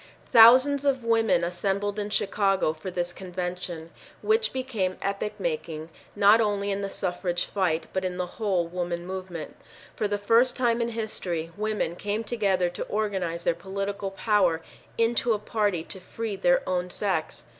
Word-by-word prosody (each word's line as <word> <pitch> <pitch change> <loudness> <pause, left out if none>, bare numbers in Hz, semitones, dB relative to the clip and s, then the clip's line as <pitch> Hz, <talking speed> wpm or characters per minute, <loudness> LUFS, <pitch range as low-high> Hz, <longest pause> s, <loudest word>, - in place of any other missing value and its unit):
Thousands 255 +5 +8
of 270 -3 +1
women 225 -6 +3
assembled 200 +4 -1
in 205 0 -3
Chicago 195 -5 +1
for 160 +4 -7
this 175 -1 -3
convention, 180 -3 -5 0.3
which 445 +1 +2
became 230 -8 -2
epoch 200 +2 -3
making 160 -2 -3 0.3
not 205 +3 +6
only 205 -2 0
in 200 0 -2
.the 200 - -3
suffrage 180 -2 -2
fight 170 -5 0
but 190 - -1
in 180 -1 -2
the 180 - -1 0.2
whole 190 -5 +1
woman 175 0 -3
movement. 185 -3 -6 0.4
For 210 - 0
the 205 0 -1
first 230 +5 +3
time 235 -2 +1
in 235 - 0
history, 185 -8 -3
women 210 -5 -1
came 205 +4 -2
together 200 -5 +1
to 180 - -4
organize 190 -6 -2
their - - +2
political 195 +2 -4
power 190 -5 +1 0.3
into 230 0 +2
a - - 0
party 205 -5 -1
to 190 - -7
free 215 +3 -5
their 175 -2 +2
own 180 -1 -1
sex. 185 -4 -2
195 Hz, 160 wpm, -26 LUFS, 180-215 Hz, 0.4 s, Thousands